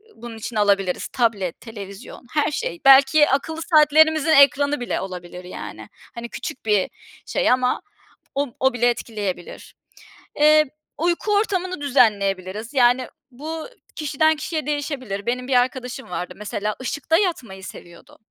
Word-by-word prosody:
bunun 230 0 -9
içine 220 0 -4
alabiliriz. 195 -3 +1
Tablet, 210 -8 -1
televizyon 205 +1 -10
her 300 0 +1
şey, 450 +1 -4
belki 275 +2 +7
akıllı 320 +4 -1
saatlerimizin 315 0 +4
ekranı 285 0 +5
bile 245 - -2
olabilir, 180 -1 -8
yani. 180 - -9 0.3
Hani, 235 0 -6
küçük 255 - -7
bir 210 -3 +2 0.4
şey - - +1
ama 250 0 +1 0.5
o 280 -3 -1
o 265 -1 +2
bile 245 0 +2
etkileyebilir. 210 -6 -5 0.6
Eee, 305 +1 +6 0.3
uyku 345 +6 0
ortamını 370 -5 -1
düzenleyebiliriz. 210 -4 +1
Yani, 250 0 +4 0.2
bu 310 +5 -6 0.3
kişiden 310 +1 +1
kişiye 310 0 -3
değişebilir. 275 -9 -3
Benim 250 +1 -2
bir - - +1
arkadaşım 255 -1 -5
vardı 180 0 -5
mesela, 210 0 -3
ışıkta 290 +5 0
yatmayı 250 - -2
seviyordu. 175 -2 -12
255 Hz, 130 wpm, -22 LUFS, 210-300 Hz, 0.6 s, belki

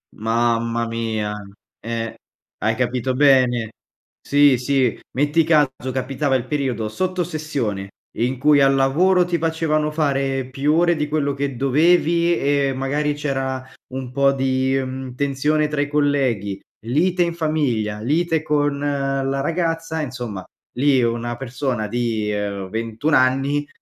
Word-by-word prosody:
Mamma 115 +1 0
mia. 110 -2 -2 0.5
Eh. 115 -1 -4 0.4
Hai 110 +1 0
capito 125 +1 -1
bene. 130 -4 +3 0.5
Sì, 145 -2 +4
sì. 130 -1 +1
Metti 145 +4 +2
caso 155 -3 +4 0.2
capitava 135 +1 -1
il 125 - -1
periodo 130 -7 -1
sotto 185 +6 -1
sessione, 140 - -3 0.3
in 125 +2 -1
cui 145 0 +5
al 135 0 +5
lavoro 175 +8 +3
ti 175 -1 0
facevano 160 -1 0
fare 135 -4 -1
più 140 +3 0
ore 175 +1 +3
di 150 -1 -2
quello 145 -2 0
che 140 -1 -3
dovevi, 170 +5 +3
e 140 -1 +1
magari, 145 +3 -1
c'era 135 -3 -3 0.3
un 130 -1 -5
po' 140 +1 +3
di, 130 0 +1
mhmm, 130 -1 -6
tensione 145 +3 +1
tra 150 -1 -3
i 145 - 0
colleghi, 135 -9 0 0.3
lite 175 +9 +1
in 170 -1 -2
famiglia, 130 -10 -1
lite 160 +6 +1
con 145 -2 0
la 135 -1 -1
ragazza, 165 0 -1
insomma, 120 -9 -5 0.3
lì 135 0 +3
una 120 0 -1
persona 125 -3 -3
di 115 -2 -1 0.4
21 115 +7 -2
anni, 135 +3 +2
135 Hz, 135 wpm, -21 LUFS, 120-150 Hz, 0.5 s, cui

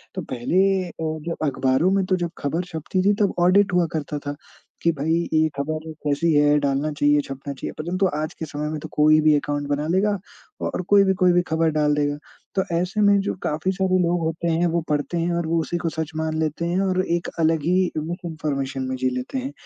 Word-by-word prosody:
तो - - -2
पहले 125 +9 0 0.3
अ, - - -12 0.3
जब 170 - -1
अख़बारों 130 +6 +2
में 195 0 +2
तो 185 - +2
जब 175 -1 -2
ख़बर 160 +5 -1
छपती 170 +2 -2
थी, 205 - +5
तब 200 - +1
ऑडिट 190 +3 +4
हुआ 180 -1 +3
करता 150 -1 -3
था, 145 - -3 0.5
कि 170 - +3
भाई 155 +1 -1 0.2
ये 160 0 +4
ख़बर 155 +3 -2 0.2
कैसी 150 +3 +1
है? 145 0 +4
डालना 140 +1 0
चाहिए? 145 0 +3
छपना 140 0 -7
चाहिए? 135 - -6
परंतु 185 +4 0
आज 155 +1 -3
के 160 - -6
समय 150 0 -4
में 155 0 -4
तो - - -7
कोई 155 +1 +5
भी 155 -1 +5
अकाउंट 145 0 -2
बना 145 +2 -1
लेगा 190 +5 +2 0.5
औ - - -1
और - - -1
कोई 200 -1 +7
भी 190 -1 +3
कोई 180 -1 +6
भी 175 - +4
ख़बर 160 0 +2
डाल 150 -1 +2
देगा। 145 0 0 0.4
तो 190 - +2
ऐसे 180 +5 0
में 205 -1 +5
जो 200 - -2
काफ़ी 155 +5 0
सारे 185 0 +1
लोग 175 +1 +1
होते 165 +1 -2
हैं, 165 +2 +2
वो 170 0 0
पढ़ते 150 +3 -1
हैं 170 +1 0
और 170 - -2
वो 165 +1 +1
उसी 175 - -3
को 170 -1 -2
सच 160 0 -4
मान 160 0 -2
लेते 160 +1 -1
हैं 175 +2 0
और 185 -1 +1
एक 170 0 -1
अलग 160 -1 +2
ही 180 +3 +2
मिसइन्फ़ॉर्मेशन 155 -5 -3
में 130 - -2
जी 130 0 0
लेते 125 - -4
हैं। 265 +2 -3
160 Hz, 230 wpm, -23 LUFS, 150-175 Hz, 0.5 s, कोई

